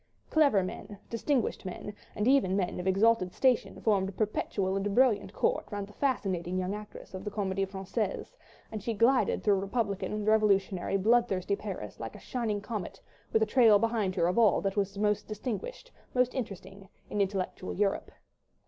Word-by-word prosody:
Clever 285 -11 +4
men, 200 +2 -7
distinguished 240 +2 0
men, 190 +2 -6 0.2
and 210 - 0
even 255 -9 +4
men 180 -3 -1
of 180 - -4
exalted 195 -1 +3
station 255 +2 +1
formed 195 -3 +2
a - - -6
perpetual 195 -1 -1
and 195 +1 -1
brilliant 250 -5 +3
court 485 +2 0
round 205 -1 -3
the 205 - -16
fascinating 185 -9 -1
young 185 +1 -1
actress 210 -1 -9
of 185 0 -6
the 210 - -3
Comédie 195 -2 -1
Française, 195 - -3 0.4
and 215 -1 -5
she 225 +2 -2
glided 250 +5 +3
through 200 -2 +3
republican, 205 0 -2
revolutionary, 200 -3 +2
bloodthirsty 200 -2 +2
Paris 190 - -7
like 115 -1 -6
a - - -10
shining 220 -5 -2
comet 205 -3 -5 0.3
with 220 - +3
a - - +3
trail 225 -2 +6
behind 220 -4 0
her 170 - +2
of 180 +6 +2
all 220 -4 +5
that 195 0 -2
was 200 -1 -1
most 210 0 0
distinguished, 250 - -5 0.2
most 250 0 +3
interesting, 195 -5 -6 0.2
in 205 - 0
intellectual 190 -1 -2
Europe. 200 0 0
205 Hz, 170 wpm, -30 LUFS, 195-230 Hz, 0.4 s, trail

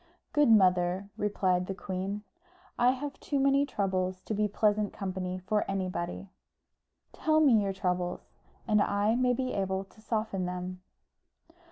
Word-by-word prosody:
"Good 295 -4 +4
mother," 185 -2 +3
replied 185 -3 0
the 195 - -3
queen, 195 +2 -4 0.6
"I 245 - +5
have 275 +2 -3
too 285 - -1
many 275 +1 +3
troubles 185 -5 -1
to - - -3
be 210 0 +1
pleasant 210 0 +1
company 185 -2 -3
for 195 +3 0
anybody." 185 -1 -3 0.8
"Tell 310 0 +2
me 260 -9 +5
your 200 -1 0
troubles, 180 -2 -2 0.4
and 210 -2 +4
I 205 +2 +2
may 250 +1 +2
be 255 +1 -2
able 190 -1 -1
to 205 +3 -21
soften 215 -4 -2
them." 180 0 -5
200 Hz, 145 wpm, -30 LUFS, 185-220 Hz, 0.8 s, I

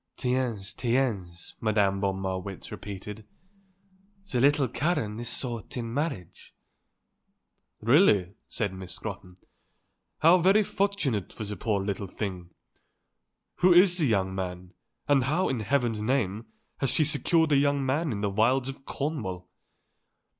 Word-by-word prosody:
"Tiens, 125 -6 -1
tiens," 110 -10 -2
Madame 100 -3 +2
von 95 -1 0
Marwitz 95 0 -5
repeated; 105 +2 -7 1.1
"the 125 - +1
little 140 0 +4
Karen 115 -6 -1
is 120 0 -4
sought 120 -2 -5
in 115 -1 -4
marriage." 140 - -4 1.3
"Really," 110 - +4
said 105 -4 -2
Miss 95 -1 -7
Scrotton, 90 0 -7 0.9
"how 170 +3 +7
very 195 +5 +5
fortunate 190 - -1
for - - -7
the 105 0 -5
poor 105 +1 0
little 100 0 -3
thing. 90 -3 -5 1.1
Who 185 - +5
is 180 0 +6
the 155 - +2
young 95 -4 +1
man, 90 -1 -5 0.3
and 140 -4 +3
how, 165 +8 +1
in 130 - -1
heaven's 115 -1 0
name, 110 -3 -1 0.3
has 135 - +1
she 155 - +3
secured 160 +2 +1
a 145 - +5
young 140 -1 +2
man 145 +3 0
in 100 -3 -3
the 100 -1 0
wilds 125 +6 +2
of 135 0 -9
Cornwall?" 110 - -4
115 Hz, 135 wpm, -27 LUFS, 100-140 Hz, 1.3 s, how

